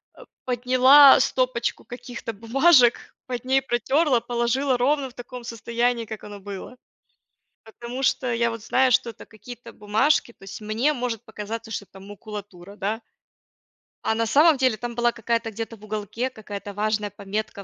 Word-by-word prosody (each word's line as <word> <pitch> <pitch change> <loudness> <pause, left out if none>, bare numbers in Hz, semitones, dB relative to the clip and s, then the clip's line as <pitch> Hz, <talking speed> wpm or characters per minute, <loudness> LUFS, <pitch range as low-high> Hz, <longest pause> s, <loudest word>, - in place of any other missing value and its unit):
э, - - -13 0.2
подняла 255 +3 +7
стопочку 255 -2 0
каких-то 245 -1 -7
бумажек, 240 +4 +3
под 245 -2 -5
ней 265 +1 +3
протерла, 265 +2 +1
положила 240 +3 0
ровно 270 +1 +1
в - - -19
таком 245 0 -9
состоянии, 235 +1 -1
как 220 -1 -8
оно 205 -1 -9
было. 200 +5 -9 0.9
Потому 240 +3 -8
что 250 -2 +1
я 235 0 +1
вот 230 -1 -6
знаю, 260 +3 +2
что 235 - +2
это 220 - -13
какие-то 235 +2 -12
бумажки, 235 +6 +1
то - - -30
есть 195 +3 -9
мне 225 +8 0
может 245 -4 -4
показаться, 225 +1 -7
что 200 - -4
это 195 - -15
макулатура, 200 -2 -10
да. 210 +3 -3 1.0
А 220 - +1
на 230 0 0
самом 295 +6 +5
деле 255 -4 +2
там 240 +1 -6
была 240 0 +2
какая-то, 230 0 -2
где-то 225 +1 -6
в 205 - -20
уголке, 215 +4 -3
какая-то 205 -3 -8
важная 210 0 -1
пометка, 200 0 -5
235 Hz, 160 wpm, -24 LUFS, 215-255 Hz, 1.0 s, подняла